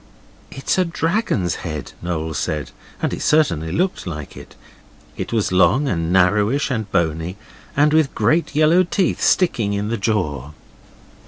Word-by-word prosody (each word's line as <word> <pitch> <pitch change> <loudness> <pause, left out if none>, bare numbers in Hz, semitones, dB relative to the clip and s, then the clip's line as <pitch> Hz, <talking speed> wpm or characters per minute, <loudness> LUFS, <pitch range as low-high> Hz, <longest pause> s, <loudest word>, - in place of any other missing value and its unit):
'It's 135 +7 -1
a - - +4
dragon's 165 - -1
head,' 75 -4 -5
Noel 80 -2 -3
said, 75 -1 -3 0.3
and - - 0
it - - -4
certainly 85 - +2
looked 180 - -1
like 75 -4 -6
it. - - -12 0.6
It - - -5
was 110 -5 0
long 130 +10 +3
and 85 -7 -1
narrowish 105 +10 +2
and 110 -5 -3
bony, 80 +2 -1 0.4
and 150 +1 +4
with 155 -3 +2
great 165 -2 +1
yellow 155 +4 +5
teeth 185 0 0
sticking 115 - +2
in 100 +1 -2
the 115 - -1
jaw. 80 - -2
105 Hz, 150 wpm, -20 LUFS, -, 0.6 s, yellow